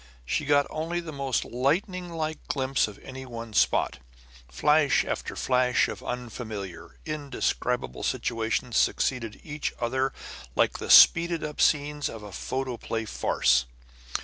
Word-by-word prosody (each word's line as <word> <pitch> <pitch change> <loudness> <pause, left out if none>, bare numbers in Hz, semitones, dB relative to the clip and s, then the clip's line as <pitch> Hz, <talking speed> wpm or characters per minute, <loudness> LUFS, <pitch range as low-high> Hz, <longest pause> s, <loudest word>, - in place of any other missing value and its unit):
She 150 - -1
got 145 0 +4
only 165 +3 -2
the 170 -2 -6
most 135 -3 -1
lightninglike 160 +4 -1
glimpse 135 -2 +1
of 105 - -10
any 130 0 -8
one 115 -3 -8
spot; - - +2 0.5
flash 150 - +3
after - - -4
flash 125 -1 +2
of - - -6
unfamiliar, 110 -6 -6
indescribable 125 - -2
situations 115 +1 -1
succeeded 115 -5 0
each 150 -1 -3
other 130 +3 0 0.4
like - - +2
the - - -6
speeded 170 -1 +7
up 150 -1 -4
scenes 145 -1 +2
of 110 -2 -9
a 105 - -9
photoplay 120 +1 -3
farce. 60 - +2
130 Hz, 125 wpm, -27 LUFS, 115-150 Hz, 0.5 s, speeded